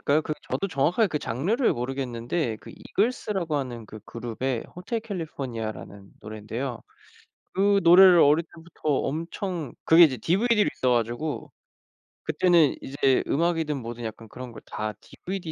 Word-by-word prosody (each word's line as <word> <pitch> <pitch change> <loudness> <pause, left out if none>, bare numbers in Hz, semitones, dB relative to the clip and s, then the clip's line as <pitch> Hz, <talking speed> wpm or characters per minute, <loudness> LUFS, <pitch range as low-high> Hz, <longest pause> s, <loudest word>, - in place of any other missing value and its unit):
팝송일까요? 150 +2 +2
그 155 - -3 0.2
저도 195 - -1
정확하게 175 - +2
그 150 - -2
장르를 185 - 0
모르겠는데 125 +1 -3
그 - - -12
Eagles라고 200 -7 -1
하는 120 -5 -4
그 110 +1 -10
그룹의 120 +1 -4
Hotel 225 +6 -3
California라는 115 - -6
노래인데요. 110 +4 -5 0.7
그 200 +1 +3
노래를 180 +1 +8
어릴 150 +3 +5
때부터 165 -1 -8
엄청 165 +3 -2
그게 165 +1 +8
이제 135 -5 +2
DVD로 210 - +2
있어 130 - 0
가지고 120 +6 -2 0.7
그때는 160 -1 +3
이제 135 -1 +1
음악이든 160 -1 0
뭐든 120 -1 -7
약간 110 0 -7
그런 125 +3 -9
걸 115 - -11
다 105 0 -4
DVD, 185 -3 -7
145 Hz, 395 characters per minute, -26 LUFS, 120-175 Hz, 0.7 s, 노래를